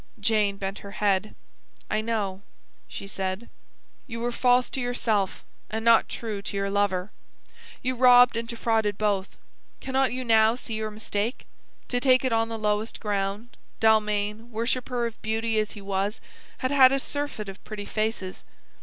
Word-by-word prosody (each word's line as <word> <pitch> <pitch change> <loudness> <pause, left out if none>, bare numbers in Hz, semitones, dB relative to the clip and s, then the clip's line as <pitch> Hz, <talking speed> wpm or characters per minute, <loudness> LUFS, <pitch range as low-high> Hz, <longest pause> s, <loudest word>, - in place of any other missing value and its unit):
Jane 205 -1 +2
bent 195 +1 -4
her 200 0 -10
head. 205 0 +1 0.5
"I 215 - 0
know," 210 -4 -2 0.5
she - - -7
said. 195 +2 -4 0.6
"You 230 -2 -5
were 240 +1 -1
false 250 +1 +3
to 265 - -2
yourself, 225 -5 -1 0.3
and 220 +1 -3
not 230 -1 +5
true 215 -4 -4
to 200 0 -5
your 195 0 -1
lover. 200 -1 0 0.7
You 255 +1 +1
robbed 245 -1 +7
and 230 0 -2
defrauded 225 -3 0
both. 200 -2 -1 0.4
Cannot 265 0 +1
you 255 +1 -3
now 225 -1 +4
see 245 -2 -5
your 220 0 -2
mistake? 215 +2 -3 0.4
To 245 - +1
take 255 0 +4
it 255 - +1
on 225 0 +1
the 225 - -4
lowest 210 +1 -1
ground, 205 +3 -2 0.2
Dalmain, 215 0 +2
worshipper 240 +1 -1
of 230 -1 -6
beauty 220 0 0
as 215 -1 -1
he 205 - -10
was, 195 +2 -1 0.4
had 255 - -2
had 265 -2 +7
a 275 - +2
surfeit 285 -7 -3
of 195 0 -9
pretty 210 -2 -6
faces. 215 -3 -3
220 Hz, 165 wpm, -26 LUFS, 205-240 Hz, 0.7 s, robbed